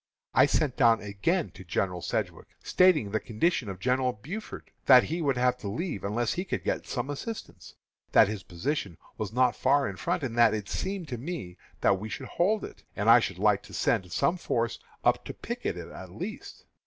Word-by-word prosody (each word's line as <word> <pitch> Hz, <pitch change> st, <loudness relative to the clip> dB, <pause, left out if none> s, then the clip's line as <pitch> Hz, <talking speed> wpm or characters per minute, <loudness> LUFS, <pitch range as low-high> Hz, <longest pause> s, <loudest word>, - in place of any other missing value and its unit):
I 130 Hz, +2 st, +6 dB
sent 140 Hz, -2 st, 0 dB
down 115 Hz, -3 st, +5 dB
again 105 Hz, -, -1 dB
to -, -, -12 dB
General 90 Hz, +1 st, -1 dB
Sedgwick, -, -, -3 dB, 0.2 s
stating 165 Hz, -, +4 dB
the 110 Hz, -, +1 dB
condition 120 Hz, -, 0 dB
of 95 Hz, -2 st, -6 dB
General 125 Hz, +3 st, +1 dB
Buford, 170 Hz, -, -7 dB
and -, -, -33 dB
that 125 Hz, -2 st, +9 dB
he 165 Hz, +3 st, -3 dB
would 140 Hz, -5 st, +1 dB
have 125 Hz, 0 st, +2 dB
to 105 Hz, -, -6 dB
leave 120 Hz, -, -3 dB
unless 110 Hz, +4 st, 0 dB
he 180 Hz, -, -2 dB
could 195 Hz, -, -3 dB
get -, -, -2 dB
some 130 Hz, +2 st, -3 dB
assistance; 220 Hz, +10 st, -7 dB, 0.4 s
that -, -, +7 dB
his 105 Hz, -1 st, -4 dB
position 90 Hz, -, -3 dB, 0.2 s
was 110 Hz, -2 st, -3 dB
not 125 Hz, +1 st, +3 dB
far 140 Hz, +2 st, +3 dB
in 95 Hz, -, -6 dB
front, 85 Hz, +10 st, -1 dB
and 120 Hz, -4 st, -3 dB
that 115 Hz, -2 st, +6 dB
it 105 Hz, -2 st, -5 dB
seemed 190 Hz, -3 st, -3 dB
to 120 Hz, -3 st, -4 dB
me 130 Hz, -, -5 dB, 0.3 s
that 95 Hz, -1 st, +3 dB
we 110 Hz, +2 st, -6 dB
should -, -, -5 dB
hold 205 Hz, +5 st, +1 dB
it, -, -, -12 dB
and 105 Hz, +2 st, +4 dB
I 120 Hz, -, +9 dB
should 95 Hz, -6 st, -3 dB
like 105 Hz, 0 st, +3 dB
to -, -, -11 dB
send 90 Hz, -1 st, 0 dB
some 175 Hz, -, +1 dB
force 115 Hz, -8 st, -1 dB, 0.2 s
up -, -, +3 dB
to -, -, -7 dB
picket -, -, -4 dB
it -, -, -7 dB
at -, -, -9 dB
least. -, -, -8 dB
120 Hz, 210 wpm, -28 LUFS, 100-150 Hz, 0.4 s, that